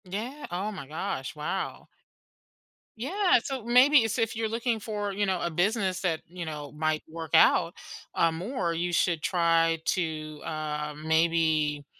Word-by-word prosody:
Yeah, 225 +10 -5
oh 190 +5 -2
my 155 -10 -8
gosh, 135 -3 -4
wow. 155 +6 -4 1.1
Yeah, 355 - +2
so 265 -4 -4
maybe 250 +2 +6
so 225 +3 -1
if 225 -1 0
you're 225 0 -1
looking 230 0 -1
for, 205 -2 -3
you 205 +1 0
know, 190 -2 0
a - - 0
business 185 +2 0
that, 165 -4 0
you 175 0 -7
know, 150 -2 -6
might 155 0 0
work 160 -1 -7
out, 165 - +5 0.4
uh, 165 - +3
more, 175 +2 -2
you 175 +2 -1
should 170 -2 +1
try 165 -1 +2
to, 155 -4 -2
um, 150 0 -4
maybe 160 -2 +2
170 Hz, 155 wpm, -28 LUFS, 155-215 Hz, 1.1 s, maybe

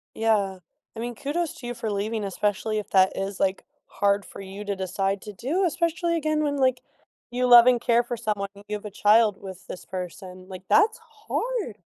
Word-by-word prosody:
Yeah. 205 -4 +1 0.4
I - - -7
mean, 240 +1 -3
kudos 305 +7 -2
to 245 - -8
you 245 - -3
for 230 -2 -4
leaving, 210 +2 -2
especially 205 +2 -1
if 210 - -8
that 190 -1 +5
is, 195 0 -3
like, 190 0 0 0.2
hard 200 0 +1
for - - -11
you 195 +1 -8
to 205 -1 -2
decide 195 +1 -1
to 210 - -8
do, 310 - 0
especially 335 +1 0
again 310 -1 0
when, 290 -1 0
like, 260 -2 +2 0.5
you 250 +1 +1
love 240 -1 +9
and 245 -2 +4
care 235 0 +4
for 240 0 -4
someone 210 -3 -2
and 200 - -14
you 210 - -1
have 205 - -14
a 210 - -6
child 210 +1 +4
with 190 -2 -10
this 180 - -8
person, 185 0 -7
like, 185 -1 -9
that's 430 +1 +4
hard. 455 - -4
215 Hz, 205 wpm, -25 LUFS, 195-260 Hz, 0.5 s, love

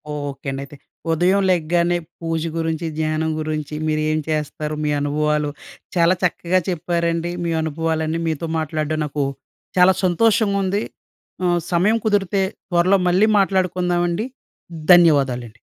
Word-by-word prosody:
Okay 140 -1 -6
అండి 135 0 -4
అయితే. 140 - -14 0.4
ఉదయం 180 +5 +3
లెగ్గానే 175 0 +2 0.2
పూజ 165 -1 -1 0.2
గురించి, 160 0 -2
ధ్యానం 155 0 0
గురించి, 155 -1 -3
మీరేం 155 0 0
చేస్తారు? 150 0 -2
మీ 150 - 0
అనుభవాలు 150 +1 0 0.5
చాలా 170 +1 +4
చక్కగా 180 +1 +1
చెప్పారండి 170 0 -1
మీ 170 - -1
అనుభవాలన్నీ. 160 +1 -1
మీతో 160 +1 -2
మాట్లాడడం 155 0 -2
నాకు 145 0 -2 0.5
చాలా 185 +1 +6
సంతోషంగుంది. 200 +1 +2 0.6
ఆహ్, 175 -1 +2
సమయం 205 +7 +3
కుదిరితే 200 -2 +1 0.3
త్వరలో 185 +3 +4
మళ్ళీ 185 +5 +4
మాట్లాడుకుందామండి. 180 0 0 0.7
ధన్యవాదాలండి. 135 -9 +3
165 Hz, 115 wpm, -21 LUFS, 155-180 Hz, 0.7 s, చాలా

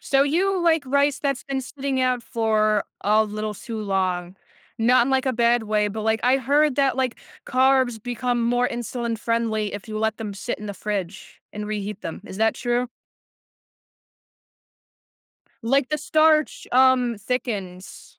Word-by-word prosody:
So 275 0 +2
you 365 +6 +1
like 325 -3 +3
rice 280 +1 +2
that's 275 -2 -2
been 275 -1 -2
sitting 270 +1 -3
out 255 -1 +1
for 215 -2 +1 0.2
a 215 +1 +3
little 215 0 -4
too 225 +2 -6
long. 185 -2 -1 0.4
Not 240 +2 +4
in, 270 - -1
like, 265 0 +1
a 260 - +2
bad 235 -1 +2
way, 210 -1 +1
but, 215 +2 -5
like, 220 0 +1
I 255 +2 +4
heard 285 +3 +2
that, 275 -2 +2
like, 260 -2 -1 0.3
carbs 255 -3 +2
become 245 0 -1
more 245 +1 +2
insulin-friendly 230 -2 -2
if 205 - -7
you 215 -1 -5
let 220 0 0
them 215 -3 -5
sit 240 +5 -4
in 210 - -8
the 200 - -5
fridge 195 -2 -5
and 210 0 -5
reheat 210 -1 -4
them. 165 - -6
Is 190 - -8
that 220 0 +2
true? 240 0 -1 2.8
Like, 265 +2 +2
the 300 - -1
starch, 310 0 +2
um, 250 -2 +4
thickens. 205 -6 -5
235 Hz, 160 wpm, -23 LUFS, 215-265 Hz, 2.8 s, Not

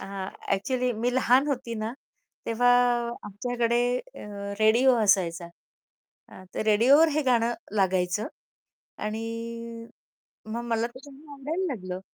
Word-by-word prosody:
आ, - - -7 0.5
actually 250 +5 -1
मी 235 +3 -1
लहान 260 +2 +4
होती 250 -4 -2
ना, 220 +2 -3 0.5
तेव्हा 235 +2 +2 0.6
आमच्याकडे 235 +3 -1 0.2
अ, - - -11 0.4
रेडिओ 235 +4 +5
असायचा. 175 -4 +2 0.8
अ, 190 - -13
ते - - -1
रेडिओवर 245 +9 +5
हे 305 - +2
गाणं 240 -3 +2 0.2
लागायचं 185 +1 +1 0.8
आणि 215 +1 -3 1.3
मग 235 - -3
मला 230 -1 0
ते 240 +2 -12
गाणं 290 +2 -14
आवडायला 305 +7 -3
लागलं. 185 -4 -6
235 Hz, 120 wpm, -27 LUFS, 210-260 Hz, 1.3 s, रेडिओ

